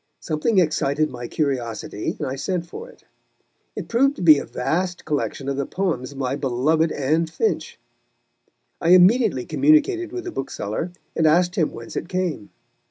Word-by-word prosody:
Something 165 +8 -1
excited 155 -3 +2
my 120 -1 -6
curiosity, 120 -8 -2
and 150 - -3
I 130 - -3
sent 170 +5 -2
for 465 - -9
it. 480 - -19 0.7
It - - -5
proved 275 +4 +2
to - - -6
be 155 -4 +8
a - - -6
vast 175 +7 -2
collection 145 -2 -2
of 140 -1 -2
the 140 - -2
poems 155 -9 -2
of - - -13
my 135 0 -1
beloved 150 +4 +1
Anne 155 +4 0
Finch. 440 - -2 1.0
I 170 +2 +6
immediately 185 - +4
communicated 310 +4 +2
with 365 0 -5
the - - -5
bookseller, 135 - -4 0.2
and 160 - +3
asked 175 +3 +3
him 160 -6 +1
whence 115 0 -9
it 170 - -4
came. 180 - -2
160 Hz, 165 wpm, -22 LUFS, 135-185 Hz, 1.0 s, be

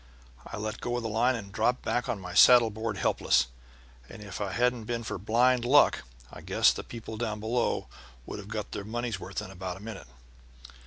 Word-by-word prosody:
I - - -7
let 110 +1 -4
go 120 0 -2
of 120 - -4
the 115 - -2
line 120 +4 +2
and 100 -4 -7
dropped 125 +6 0
back 120 - -1
on 105 - -1
my 90 -2 -8
saddle 120 +3 +7
board 110 -1 -4
helpless, - - +2 0.6
and 110 -2 -10
if 100 0 -7
it 100 -2 -2
hadn't 125 -1 +1
been 120 +1 -3
for 110 - -4
blind 120 +5 +3
luck 135 +4 +5 0.3
I - - -9
guess - - +3
the - - -6
people 110 -1 -8
down 110 -2 -3
below 115 +3 0 0.4
would - - -6
have 100 - -9
got 105 -1 -4
their 100 - -5
money's 115 0 -3
worth 95 +1 -5
in 90 - -9
about 95 -1 -6
a - - -12
minute. 105 - -8
110 Hz, 210 wpm, -28 LUFS, 100-120 Hz, 0.6 s, saddle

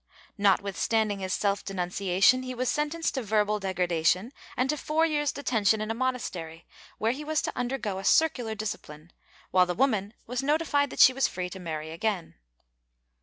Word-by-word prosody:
Notwith 200 -1 +2
standing 215 -3 +1
his 190 -1 -4
self 200 0 0
denunciation, 195 +5 +2
he 255 0 -5
was 255 +1 -1
sentenced 300 +2 -1
to 265 - -2
verbal 210 -1 +1
degra 185 -2 -1
dation 175 +7 +1 0.3
and 255 - +2
to - - -1
four 310 +2 +1
years' 295 -3 0
detention 225 -6 +1
in 215 +1 -2
a - - 0
monastery, 205 -10 -3 0.3
where 220 +1 +1
he 280 +4 -5
was 310 0 0
to - - -3
undergo 240 -6 -2
a - - -7
circular 245 -5 +2
discipline, 175 -7 -7 0.4
while 185 -1 +4
the 180 - -2
woman 220 -5 +1
was 245 +1 -3
notified 290 0 +1
that - - 0
she 260 - +9
was 270 +1 +2
free 180 0 -5
to 190 - -7
marry 160 -3 -5
again. 180 0 -2
215 Hz, 180 wpm, -27 LUFS, 185-260 Hz, 0.4 s, she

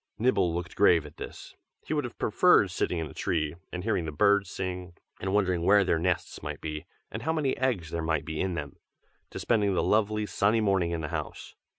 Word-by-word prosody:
Nibble 110 -7 +2
looked 85 +1 -4
grave 85 -6 +4
at 75 - -12
this. - - -9 0.3
He - - -2
would 145 -3 0
have 120 - -8
preferred - - +4
sitting 90 - -1
in 80 - -2
a - - -10
tree, 75 -3 -1 0.2
and 90 0 -5
hearing 105 -6 0
the 80 - -3
birds 100 +5 +3
sing, 90 -1 -5 0.3
and 95 - -2
wondering 95 -4 +1
where 100 +3 +5
their 85 -3 +1
nests 90 +1 -1
might - - -5
be, 75 -1 -6 0.2
and - - -5
how 160 - 0
many 150 -5 0
eggs 110 -12 -1
there 85 - -2
might 80 -2 -1
be 80 -1 -3
in 95 -2 -1
them, 75 -4 -6 0.5
to - - -8
spending 105 -4 +1
the - - +1
lovely, 105 0 +2
sunny 105 +2 +2
morning 95 -5 +2
in 85 -1 -2
the 75 - -4
house. - - -5
90 Hz, 220 wpm, -28 LUFS, 80-105 Hz, 0.5 s, where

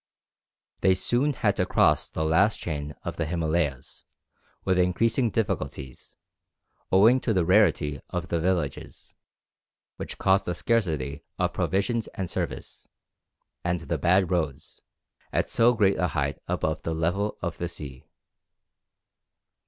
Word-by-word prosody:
They 95 -1 +4
soon 125 +9 +1
had - - 0
to - - +2
cross - - +3
the 80 - -2
last 95 +7 +3
chain 75 -2 -5
of - - -5
the 80 - -1
Himalayas, 80 -5 -2 0.6
with 95 -1 +2
increasing 115 +7 +2
difficulties, 70 - -4 0.8
owing 110 +7 +6
to 115 -4 -1
the 90 -3 +2
rarity 80 -7 +3
of 90 0 -4
the 85 - 0
villages, 85 -5 -3 0.8
which - - -6
caused 95 0 +2
a 90 - -1
scarcity 75 - -1
of - - 0
provisions 100 +6 0
and 95 -3 -3
service, - - -5 0.8
and 85 -1 -1
the - - -3
bad 90 +1 +3
roads, 80 -5 -3 0.5
at - - 0
so 120 +1 +4
great 100 -3 +2
a 90 - +2
height 70 -5 -2
above 80 0 -1
the 80 - -3
level 95 +6 -1
of 85 -2 -3
the 85 - -2
sea. 70 -5 -9
90 Hz, 135 wpm, -26 LUFS, 80-100 Hz, 0.8 s, owing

